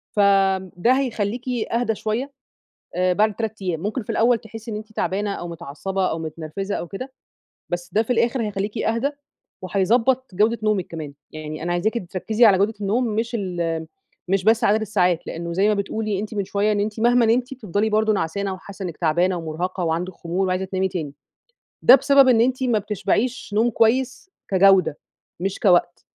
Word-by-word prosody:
فده 195 0 +2
هيخليكِ 240 -2 -2 0.3
أهدى 230 -1 +1
شوية 225 +7 -3 0.7
بعد 185 +4 +2
3 220 -2 -4
أيام، 170 -4 -1
ممكن 215 +7 -3
في - - -8
الأول 235 +1 +3
تحسّي 225 0 -10
إن 210 - -3
أنتِ 215 +1 -9
تعبانة 205 0 -1
أو 175 - -6
متعصبة 170 +4 -3
أو 160 - -2
متنرفزة 160 +5 -5
أو 175 - -5
كده، 255 +8 -7 0.6
بس 175 0 -4
ده 215 - +4
في 225 - -10
الآخر 235 +1 +1
هيخليكِ 205 +1 -3
أهدي 230 +6 0 0.5
وهيضبّط 225 +6 +1
جودة 220 +5 +2
نومِك 215 -4 +1
كمان. 155 -4 -7 0.2
يعني 155 0 -7
أنا 175 +1 -1
عايزاكِ 175 +6 0 0.2
تركّزي 220 +5 +1
على 195 -3 +5
جودة 205 +3 +1
النوم 210 +5 +1
مش 225 +2 -1
ال 170 -4 -2 0.4
مش 190 0 +1
بس 220 +1 +4
عدد 215 +2 +3
الساعات، 180 -5 +1
لأنه 170 +1 -5
زي 195 +4 +3
ما 215 - +3
بتقولي 205 0 -2
أنتِ 215 +1 -6
من 200 -1 -1
شوية، 205 +2 0
إن 205 - 0
أنتِ 210 +1 -3
مهما 240 0 +4
نمتِ 245 +4 +1
بتفضلي 215 -3 -1
برضه 215 0 +2
نعسانة، 195 +2 -2
وحاسة 195 +1 -10
إنِّك 170 -4 -5
تعبانة 175 +3 +1
ومرهقة 175 +3 -3
وعندِك 170 +3 -2
خمول 180 +3 -2
وعايزة 185 +1 0
تنامي 190 0 -1
تاني، 160 -7 -5 0.7
ده 250 - +10
بسبب 275 0 +5
إن 230 -3 +5
أنتِ 255 +2 +1
ما 240 -4 +2
بتشبعيش 210 +5 -1
نوم 225 +3 +3
كويس 255 - +1 0.2
كجودة 190 -5 +4 0.4
مش 195 +1 -2
كوقت، 180 -4 +2
200 Hz, 175 wpm, -22 LUFS, 180-225 Hz, 0.7 s, ده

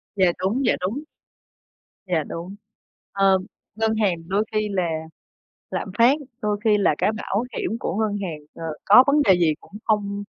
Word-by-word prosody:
Dạ, 185 -3 +4
đúng, 220 +9 0
dạ, - - +4
đúng. 220 +11 -2 1.0
Dạ, 165 -4 +1
đúng. 175 +4 -7 0.6
Ờ, 195 -1 +4 0.4
ngân 220 0 0
hàng 205 -5 +2
đôi 195 +3 +1
khi 215 -1 0
là 190 -2 0 0.9
lạm 195 - -3
phát 245 +5 +5 0.2
đôi 210 -1 0
khi 215 -2 +4
là 195 -7 +2
cái - - +2
bảo 215 0 -2
hiểm - - -1
của - - -3
ngân 215 -1 0
hàng, 170 -6 -4 0.2
ờ, 165 - -8 0.2
có 215 +6 +8
vấn 290 +1 +4
đề 200 -9 +5
gì 160 -3 +3
cũng - - -20
không 205 -1 0
205 Hz, 175 wpm, -23 LUFS, 190-220 Hz, 1.0 s, có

